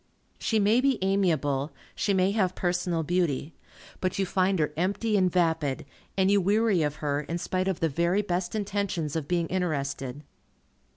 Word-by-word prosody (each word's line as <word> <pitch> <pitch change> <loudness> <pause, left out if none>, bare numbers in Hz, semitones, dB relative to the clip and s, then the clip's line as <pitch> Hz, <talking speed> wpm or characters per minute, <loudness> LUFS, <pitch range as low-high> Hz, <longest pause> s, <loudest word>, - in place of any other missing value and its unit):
She 225 - 0
may 215 +4 +4
be 270 -2 +2
amiable. 160 -8 +1 0.2
She 205 - 0
may 190 0 +3
have 190 -4 +1
personal 175 -2 0
beauty. 165 -3 0 0.5
But 185 - -1
you 195 - +1
find 190 +1 +1
her 150 -2 0
empty 200 +6 0
and 185 -3 +3
vapid, 160 -7 0 0.3
and 190 0 +3
you 200 -1 +4
weary 205 -1 +2
of 150 -1 0
her, 145 0 0
in 165 +3 -4
spite 185 +2 -1
of 190 -3 -1
the 165 - +3
very 170 +7 +1
best 180 0 -2
intentions 200 -7 -2
of 155 -3 -2
being 175 -1 +1
interested. 140 -6 -2
180 Hz, 170 wpm, -27 LUFS, 160-195 Hz, 0.5 s, may